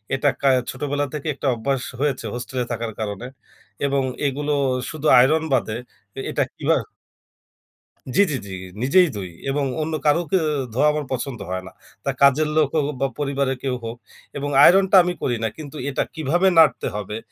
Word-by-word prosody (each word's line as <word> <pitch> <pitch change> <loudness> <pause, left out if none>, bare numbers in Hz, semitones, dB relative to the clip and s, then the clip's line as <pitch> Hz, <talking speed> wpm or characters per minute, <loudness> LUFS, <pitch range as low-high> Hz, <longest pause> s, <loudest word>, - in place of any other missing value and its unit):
এটা 140 +2 +2
কা 140 - +2 0.2
ছোটোবেলা 145 +2 -2
থেকেই 150 +1 -2
একটা 140 - -3
অভ্যাস 135 +3 -1 0.2
হয়েছে 135 -4 -1
হোস্টেলে 125 +1 -3
থাকার 115 -1 -3
কারণে 105 +1 -4 0.6
এবং 140 -1 +1 0.2
এগুলো 145 +2 -2 0.4
শুধু 155 -1 -3
আইরন 155 +5 +4
বাদে 110 -4 0 0.6
এটা - - +1
কিভাবে? - - +1 1.3
জি, - - +6
জি, - - -1
জি, - - -9 0.3
নিজেই 175 +8 +5
ধুই 95 -3 -5 0.2
এবং 140 +1 0 0.2
অন্য 160 +1 -2
কারোকে 165 +4 +2 0.4
ধোয়া 135 +6 +3
আমার 150 -1 -2
পছন্দ 130 -1 -3
হয় 95 0 -3
না। - - -10 0.3
তা 140 - 0
কাজের 140 +2 +5
লোক 155 -3 +3
হোক 150 -2 0
বা 135 - +3
পরিবারের 140 -2 -1
কেউ 130 -2 -1
হোক 115 +1 -5 0.4
এবং 145 +1 -3
আইরনটা 190 +1 +6
আমি 180 0 -1
করি 120 -2 0
না। - - +2
কিন্তু 155 -2 -9
এটা 140 - 0
কিভাবে 165 +5 +1
নাড়তে 160 -2 +5
হবে? 105 +1 -4
140 Hz, 165 wpm, -22 LUFS, 125-150 Hz, 1.3 s, জি